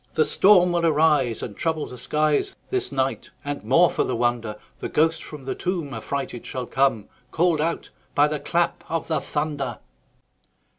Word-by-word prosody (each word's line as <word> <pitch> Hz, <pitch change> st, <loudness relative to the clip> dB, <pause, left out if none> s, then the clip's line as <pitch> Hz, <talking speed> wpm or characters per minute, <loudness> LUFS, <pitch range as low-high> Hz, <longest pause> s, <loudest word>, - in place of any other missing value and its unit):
The 155 Hz, -, +4 dB
storm 185 Hz, -3 st, +5 dB
will 170 Hz, -1 st, 0 dB
arise, 150 Hz, -7 st, +3 dB
And 105 Hz, -, -6 dB
trouble 160 Hz, +2 st, -1 dB
the 125 Hz, -, -9 dB
skies 150 Hz, +3 st, +1 dB, 0.2 s
This 385 Hz, -1 st, -1 dB
night; 135 Hz, 0 st, -1 dB, 0.2 s
and, 145 Hz, 0 st, -4 dB
more 135 Hz, +11 st, +5 dB
for -, -, +1 dB
the -, -, -2 dB
wonder, 120 Hz, -2 st, 0 dB, 0.2 s
The -, -, -4 dB
ghost 160 Hz, +1 st, +2 dB
from 150 Hz, -4 st, -10 dB
the 135 Hz, -, -2 dB
tomb 170 Hz, -6 st, -3 dB
Affrighted 135 Hz, -4 st, -4 dB
shall 130 Hz, -1 st, -5 dB
come, 130 Hz, -5 st, +1 dB, 0.2 s
Call'd 165 Hz, -2 st, +2 dB
out 165 Hz, +2 st, -2 dB, 0.2 s
by 145 Hz, +1 st, +5 dB
the 150 Hz, 0 st, -2 dB
clap 170 Hz, +3 st, 0 dB
of 165 Hz, 0 st, -2 dB
the 160 Hz, -, 0 dB
thunder. 145 Hz, -4 st, -3 dB
150 Hz, 170 wpm, -24 LUFS, 130-165 Hz, 0.2 s, storm